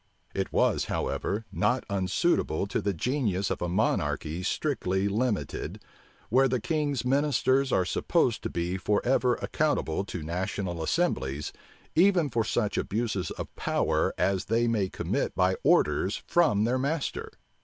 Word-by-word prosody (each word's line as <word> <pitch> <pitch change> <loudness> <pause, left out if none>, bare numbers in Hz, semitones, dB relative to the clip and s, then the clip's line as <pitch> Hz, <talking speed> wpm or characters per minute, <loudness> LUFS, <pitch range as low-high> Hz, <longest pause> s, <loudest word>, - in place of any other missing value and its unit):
It - - -2
was, - - +2
however, 105 +3 -2
not 125 +5 +1
unsuitable 95 - +1
to 100 - -2
the 100 - 0
genius 100 - -1
of - - -3
a 90 - -1
monarchy 90 -3 0
strictly 95 -4 0
limited, 110 +1 -2 0.5
where 130 +4 +4
the 130 -1 0
king's 145 0 -1
ministers 135 0 +2
are 90 - +2
supposed - - +1
to - - -3
be 85 +2 -2
forever 120 +6 +2
accountable 145 - 0
to 90 -5 -6
national 90 +1 -3
assemblies, 75 - -1 0.4
even 175 -4 +4
for 115 -1 +1
such 105 -1 0
abuses 105 -3 -2
of - - -7
power - - +1
as 95 -1 +1
they 115 +2 +1
may 105 -5 +1
commit - - -2
by 95 +1 +3
orders 75 +7 +2
from 135 -12 +3
their 125 +3 +1
master. 145 +3 -2
105 Hz, 140 wpm, -28 LUFS, 95-130 Hz, 0.5 s, where